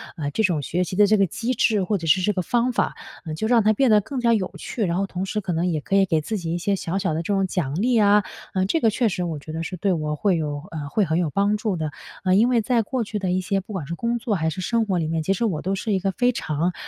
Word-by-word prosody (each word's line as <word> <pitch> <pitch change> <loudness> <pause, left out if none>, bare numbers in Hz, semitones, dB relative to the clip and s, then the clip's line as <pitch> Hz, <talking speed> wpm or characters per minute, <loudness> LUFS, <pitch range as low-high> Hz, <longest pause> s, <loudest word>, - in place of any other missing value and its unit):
呃 150 -5 -3
这 220 - 0
种 175 -7 +1
学 175 +6 -1
习 180 - -5
的 205 +2 +6
这 215 +1 +4
个 195 - +4
机 230 +6 -2
制， 215 -5 +2
或 205 +2 0
者 165 -3 -6
是 185 +4 +4
这 210 - +2
个 185 - -1
方 240 +7 +1
法， 245 - 0 0.4
就 220 +8 -2
让 235 0 +4
它 215 +1 +4
变 260 +4 +2
得 210 - +6
更 235 +6 -5
加 235 -1 +4
有 200 -5 0
趣。 225 - -3
然 170 -1 -1
后 195 - +1
同 185 0 -4
时 210 +2 -2
可 185 - -3
能， 165 +2 0
也 160 -4 -1
可 150 +8 -1
以 195 -1 +5
给 160 -4 +1
自 215 +8 -3
己 165 -3 -3
一 - - 0
些 195 +3 0
小 180 -1 -3
小 190 -5 0
的 160 - -1
这 200 - -1
种 195 -1 +2
奖 165 -7 -2
励 245 +1 +2
啊。 205 0 +5 0.5
这 330 - +2
个 225 - +3
确 230 +2 +1
实 180 -2 -2
我 165 -3 -3
觉 155 - -9
得 160 - -4 0.2
对 200 - +2
我 155 -3 -1
会 190 +2 +1
有， 145 -2 -3
嗯 150 -3 -5
会 210 +8 +1
很 160 -3 0
有 170 -3 0
帮 200 +5 +1
助 210 -2 -1
的。 155 -3 -3 0.3
啊， 185 -1 +2
因 215 +5 +5
为 245 -2 +3
在 235 +1 +2
过 250 +3 -2
去 210 0 -4
的 185 -2 -1
一 185 +1 +1
些， 195 +1 0
不 195 +3 -9
管 180 -7 -4
是 170 - -4
工 235 +5 -1
作 230 -2 -1
还 160 -3 0
是 185 - -5
生 230 +4 +1
活 190 -3 0
里 160 - -1
面， 160 0 -1
其 195 - +1
实 195 - -2
我 175 -9 -1
都 190 +2 -1
是 215 +3 -3
一 190 - +2
个 195 +1 0
非 245 +5 +2
常， 170 -6 -1
195 Hz, 340 characters per minute, -23 LUFS, 165-215 Hz, 0.5 s, 的